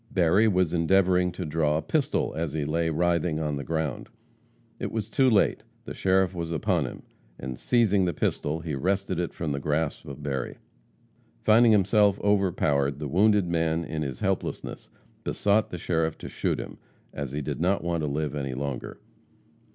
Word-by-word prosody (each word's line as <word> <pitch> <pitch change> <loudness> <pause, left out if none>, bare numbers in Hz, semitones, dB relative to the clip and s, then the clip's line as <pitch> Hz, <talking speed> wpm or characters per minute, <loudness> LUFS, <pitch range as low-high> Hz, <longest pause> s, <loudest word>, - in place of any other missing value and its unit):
Berry 95 0 +3
was 90 -5 +2
endeavoring 90 +1 +3
to 90 0 -5
draw 75 -1 +1
a - - -1
pistol, 145 - 0
as 80 -2 -2
he 75 -2 -1
lay 80 +2 0
writhing 85 0 +1
on 75 -2 -1
the 70 - -4
ground. 80 -4 -3 0.7
It - - -3
was 110 -1 -3
too 130 +2 +4
late; 105 -4 +3 0.2
the - - -6
sheriff 95 -1 +2
was 85 -2 -4
upon 85 -2 +1
him, - - -9 0.3
and, 65 -1 -6
seizing 105 -6 +3
the 90 - +1
pistol, 75 +3 -1
he 80 -1 -4
wrested 95 +5 -1
it 85 - -1
from 80 -3 -4
the 70 - -2
grasp 75 +1 -2
of 70 +1 -8
Berry. 65 -3 -3 0.9
Finding 115 +2 +6
himself 105 0 +4
overpowered, 85 -9 +1
the 75 0 -4
wounded 100 +4 +3
man, 80 -1 0
in 75 +1 -4
his 65 -5 -4
helplessness, - - -3 0.3
besought 105 +2 +1
the 90 - -5
sheriff 80 -1 -1
to - - -8
shoot - - -1
him, - - -8 0.3
as 70 -3 -4
he 75 +2 -3
did - - -4
not 95 +2 +1
want 85 -2 -1
to 75 - -1
live 75 +1 -2
any 70 -3 -3
longer. 70 -1 -5
85 Hz, 180 wpm, -26 LUFS, 75-95 Hz, 0.9 s, Finding